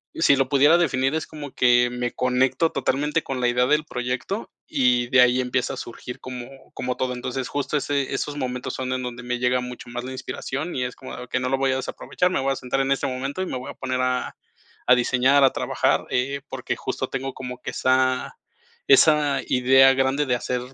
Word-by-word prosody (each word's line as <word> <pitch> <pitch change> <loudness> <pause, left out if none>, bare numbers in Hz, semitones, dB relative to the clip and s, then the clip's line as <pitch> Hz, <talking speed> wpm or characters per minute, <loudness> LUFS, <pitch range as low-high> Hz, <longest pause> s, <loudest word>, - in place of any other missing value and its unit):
si 160 -3 +4
lo 135 -1 0
pudiera 145 +4 +5
definir 135 -4 +1
es 160 - -2
como 145 -3 -9
que 120 0 +4
me 125 0 -2
conecto 130 +5 +1
totalmente 150 +4 0
con 135 -1 -4
la 125 - +2
idea 125 +1 +2
del 150 +2 +2
proyecto 125 - -4 0.2
y 125 -2 +2
de 125 0 +6
ahí 125 0 +4
empieza 125 0 -1
a - - -11
surgir 120 +1 -8
como 125 -2 -7 0.3
como 125 0 -3
todo. 130 -1 -1
Entonces, 125 +1 -4
justo, 145 +1 -1
ese 140 -1 -1
esos 145 - -3
momentos 125 -2 -3
son 130 -1 -3
en 130 0 -2
donde 125 0 -6
me 125 0 -3
llega 125 0 +1
mucho 125 -1 -8
más 120 0 -5
la 130 - -6
inspiración 140 +4 -5
y 125 - -1
es 125 - -6
como, 130 - -9
ah, 125 - -8
que 130 - 0
no 125 - -2
lo 135 - +1
voy 135 0 +1
a - - 0
desaprovechar, 180 +6 -2
me 185 - 0
voy 135 +1 0
a - - -5
sentar 130 +2 -1
en 135 0 0
este 135 - +1
momento 135 +6 -3
y - - -1
me 130 - -3
voy 125 - -7
a - - -14
poner 130 -1 -2
a 130 0 -1 0.5
a 125 - +7
diseñar, 130 +3 +3
a 135 - +4
trabajar, - - 0
eh, 140 +3 -1
porque, - - -3
justo, - - -4
tengo 135 0 -4
como 125 -1 -7
que - - -5
esa 130 0 +1 0.5
esa 145 +1 +5
idea 135 +1 +5
grande 135 +2 +1
de 125 -2 +1
hacer 125 +1 -2
130 Hz, 225 wpm, -23 LUFS, 125-135 Hz, 0.5 s, a